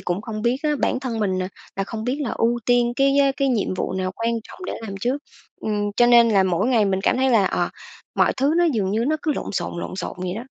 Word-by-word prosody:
cũng 180 Hz, +4 st, -2 dB
không 215 Hz, -1 st, -5 dB
biết 240 Hz, +2 st, +2 dB
á 305 Hz, -, +1 dB
bản 255 Hz, -, 0 dB
thân 245 Hz, -4 st, -3 dB
mình, 185 Hz, -3 st, 0 dB
à, 185 Hz, -, -3 dB, 0.3 s
là 195 Hz, -, -1 dB
không 220 Hz, +1 st, -6 dB
biết 255 Hz, +4 st, -1 dB
là 265 Hz, -6 st, -2 dB
ưu 235 Hz, +1 st, +1 dB
tiên 240 Hz, -1 st, +3 dB
cái, 275 Hz, +1 st, +3 dB
á, 275 Hz, -1 st, +4 dB
cái 275 Hz, -1 st, +1 dB
nhiệm 215 Hz, -6 st, 0 dB
vụ 185 Hz, -, -2 dB
nào 185 Hz, 0 st, -2 dB
quan 230 Hz, +1 st, 0 dB
trọng -, -, -13 dB
để -, -, -3 dB
làm 215 Hz, -3 st, -6 dB
trước. 250 Hz, +6 st, 0 dB, 0.4 s
Ừm, 205 Hz, -1 st, -1 dB
cho 240 Hz, -, +5 dB
nên 235 Hz, -1 st, +6 dB
là 200 Hz, -3 st, +4 dB
mỗi 190 Hz, +3 st, +1 dB
ngày 235 Hz, -5 st, +3 dB
mình 190 Hz, -1 st, 0 dB
cảm -, -, +2 dB
thấy 265 Hz, 0 st, +2 dB
là, 220 Hz, -5 st, +4 dB
ờ, -, -, 0 dB, 0.5 s
mọi -, -, +3 dB
thứ 280 Hz, +4 st, +2 dB
nó 350 Hz, -, +4 dB
dường 220 Hz, -, +1 dB
như 225 Hz, +3 st, 0 dB
nó 310 Hz, +3 st, +1 dB
cứ 310 Hz, -, +1 dB
lộn -, -, -5 dB
xộn, 175 Hz, -2 st, -3 dB
lộn -, -, -6 dB
xộn -, -, -4 dB
vậy 180 Hz, 0 st, -3 dB
đó. 230 Hz, -, -6 dB
230 Hz, 280 wpm, -22 LUFS, 195-255 Hz, 0.5 s, nên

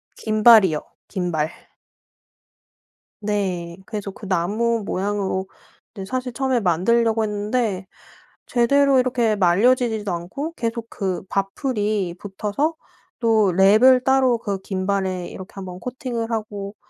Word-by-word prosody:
김발이요. 215 Hz, -7 st, +5 dB, 0.3 s
김발. 175 Hz, -5 st, -2 dB, 1.7 s
네. 185 Hz, -5 st, -2 dB
그래서 205 Hz, -2 st, -5 dB
그 200 Hz, +1 st, -11 dB
나무 210 Hz, +5 st, 0 dB
모양으로 195 Hz, -1 st, -2 dB, 0.5 s
네 195 Hz, -2 st, -6 dB
사실 250 Hz, +3 st, -3 dB
처음에 260 Hz, -1 st, +1 dB
만들려고 225 Hz, +5 st, +2 dB
했는데 210 Hz, -1 st, -1 dB, 0.6 s
제대로 275 Hz, +2 st, +3 dB
이렇게 240 Hz, -3 st, +1 dB
말려지지도 210 Hz, +3 st, +2 dB
않고 190 Hz, -, -4 dB
계속 230 Hz, -4 st, -3 dB
그 190 Hz, -4 st, -3 dB
밥풀이 205 Hz, -3 st, -1 dB
붙어서 210 Hz, +10 st, -2 dB, 0.5 s
또 220 Hz, -5 st, +3 dB
랩을 215 Hz, +8 st, +6 dB
따로 265 Hz, -2 st, +3 dB
그 200 Hz, -4 st, -3 dB
김발에 190 Hz, -2 st, -2 dB
이렇게 190 Hz, 0 st, -10 dB
1 195 Hz, -1 st, -7 dB
번 180 Hz, 0 st, -8 dB
코팅을 245 Hz, -2 st, -4 dB
하고 205 Hz, -2 st, -4 dB
210 Hz, 250 characters per minute, -22 LUFS, 190-235 Hz, 1.7 s, 랩을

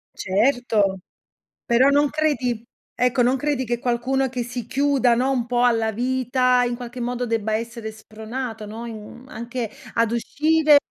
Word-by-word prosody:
Certo. 205 Hz, -2 st, +1 dB, 0.7 s
Però 255 Hz, +3 st, +4 dB
non 290 Hz, 0 st, +3 dB
credi 260 Hz, -7 st, -1 dB, 0.3 s
ecco, 250 Hz, 0 st, +2 dB
non 255 Hz, +2 st, +3 dB
credi 285 Hz, -2 st, -1 dB
che 240 Hz, 0 st, -2 dB
qualcuno 255 Hz, +2 st, 0 dB
che 250 Hz, -1 st, -3 dB
si 245 Hz, -1 st, -5 dB
chiuda, 270 Hz, -3 st, +2 dB
no, 260 Hz, +3 st, +1 dB
un 245 Hz, -3 st, 0 dB
po' 245 Hz, 0 st, +1 dB
alla 225 Hz, -2 st, +2 dB
vita, 250 Hz, +1 st, +2 dB
in 240 Hz, 0 st, -1 dB
qualche 245 Hz, 0 st, -8 dB
modo 245 Hz, +1 st, -2 dB
debba 220 Hz, -2 st, -1 dB
essere 230 Hz, 0 st, -4 dB
spronato, 220 Hz, +1 st, -7 dB
no, 225 Hz, +3 st, -7 dB
in 225 Hz, +2 st, -9 dB
anche 235 Hz, +1 st, -4 dB, 0.2 s
ad 230 Hz, -1 st, +2 dB
uscire 305 Hz, +5 st, +3 dB
245 Hz, 155 wpm, -23 LUFS, 230-260 Hz, 0.7 s, Però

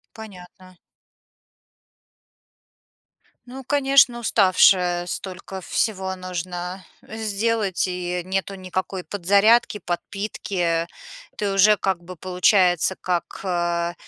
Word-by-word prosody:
Понятно. 185 Hz, -3 st, -13 dB, 2.7 s
Ну, 265 Hz, +2 st, -9 dB
конечно, 270 Hz, -3 st, +3 dB
уставшая! 185 Hz, -5 st, +3 dB
Столько 190 Hz, +1 st, -6 dB
всего 190 Hz, -1 st, -1 dB
нужно 180 Hz, 0 st, -5 dB, 0.2 s
сделать 220 Hz, -2 st, -1 dB
и 180 Hz, -1 st, -3 dB
нету 195 Hz, +1 st, -2 dB
никакой 185 Hz, 0 st, -4 dB
подзарядки, 205 Hz, +4 st, +3 dB
подпитки. 180 Hz, -2 st, -3 dB, 0.5 s
Ты 200 Hz, -2 st, -1 dB
уже, 205 Hz, +2 st, +5 dB
как 190 Hz, -3 st, -2 dB
бы 180 Hz, +1 st, -10 dB
получается, 180 Hz, 0 st, +2 dB
как, 180 Hz, -2 st, -3 dB
э, 175 Hz, -1 st, -1 dB
185 Hz, 85 wpm, -22 LUFS, 180-205 Hz, 2.7 s, уже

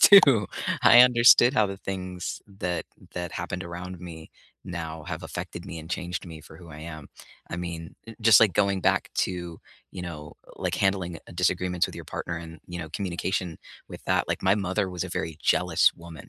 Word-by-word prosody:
too." 135 Hz, -, +8 dB, 0.4 s
I 120 Hz, -, +9 dB
understood 120 Hz, 0 st, +7 dB
how 110 Hz, -5 st, +4 dB
the 100 Hz, 0 st, -5 dB
things 90 Hz, -2 st, -5 dB
that 95 Hz, -4 st, -3 dB, 0.3 s
that 90 Hz, -1 st, -4 dB
happened 90 Hz, 0 st, -4 dB
around 90 Hz, +1 st, -7 dB
me, 80 Hz, -3 st, -9 dB, 0.3 s
now 80 Hz, -3 st, -6 dB
have -, -, -5 dB
affected 85 Hz, -, -6 dB
me 85 Hz, -3 st, -6 dB
and 80 Hz, -, -10 dB
changed 90 Hz, -1 st, -3 dB
me 80 Hz, -2 st, -9 dB
for 80 Hz, -, -14 dB
who 85 Hz, -1 st, -14 dB
I 75 Hz, -, -10 dB
am. 80 Hz, -3 st, -8 dB, 0.4 s
I 85 Hz, -, -3 dB
mean, 85 Hz, -2 st, -6 dB
eh, 115 Hz, -, -9 dB
just 110 Hz, -2 st, +7 dB
like 110 Hz, -4 st, +5 dB
going 100 Hz, +1 st, +2 dB
back -, -, +2 dB
to, 85 Hz, -2 st, -2 dB, 0.3 s
you 90 Hz, -, -6 dB
know, 75 Hz, -4 st, -7 dB, 0.2 s
like, -, -, -2 dB
handling, 95 Hz, -3 st, 0 dB
uh -, -, -14 dB
disagreements 90 Hz, 0 st, +1 dB
with -, -, -10 dB
your -, -, -8 dB
partner, 85 Hz, -, -4 dB
and, 80 Hz, -1 st, -10 dB
you 90 Hz, 0 st, -6 dB
know, 80 Hz, -2 st, -6 dB
communication 90 Hz, -1 st, -3 dB, 0.3 s
with -, -, -10 dB
that -, -, +1 dB
like, -, -, -2 dB
my 95 Hz, +1 st, +4 dB
mother 95 Hz, -1 st, -1 dB
was 90 Hz, 0 st, -3 dB
a -, -, -6 dB
very 80 Hz, -2 st, -3 dB
jealous 90 Hz, 0 st, +4 dB
woman, 85 Hz, -4 st, -12 dB
90 Hz, 195 wpm, -26 LUFS, 85-95 Hz, 0.4 s, I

